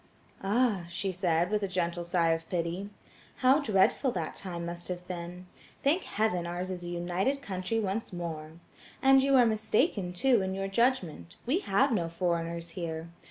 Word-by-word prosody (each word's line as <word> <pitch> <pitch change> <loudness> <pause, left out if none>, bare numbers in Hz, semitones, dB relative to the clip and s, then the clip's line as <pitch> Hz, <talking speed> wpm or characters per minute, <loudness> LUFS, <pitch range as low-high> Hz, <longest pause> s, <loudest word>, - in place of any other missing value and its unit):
"Ah!" 205 -2 +1
she 190 +3 -2
said, 175 -1 +1
with 210 -1 +1
a 200 - 0
gentle 175 -2 -1
sigh 170 -1 +2
of 165 0 -1
pity, 175 +3 -2 0.6
"how 265 +4 +7
dreadful 215 +3 +3
that 165 -4 -3
time 175 -3 -5
must 170 0 -6
have 180 0 -5
been. 180 0 -6 0.4
Thank 315 +7 +2
heaven, 190 -5 0
ours 180 +2 -3
is 180 -1 -5
a - - -6
united 180 +10 -1
country 190 +1 -2
once 210 +1 -2
more. 160 -3 -5 0.5
And 270 0 +7
you 275 0 +3
are 250 -2 +7
mistaken, 215 - +1
too, 235 +5 +3
in 190 0 -2
your 195 0 -2
judgment: 195 - 0
we 280 +10 +2
have 270 - +2
no 170 -7 0
foreigners 170 -1 -2
here. 165 -1 -5
185 Hz, 170 wpm, -30 LUFS, 170-215 Hz, 0.6 s, how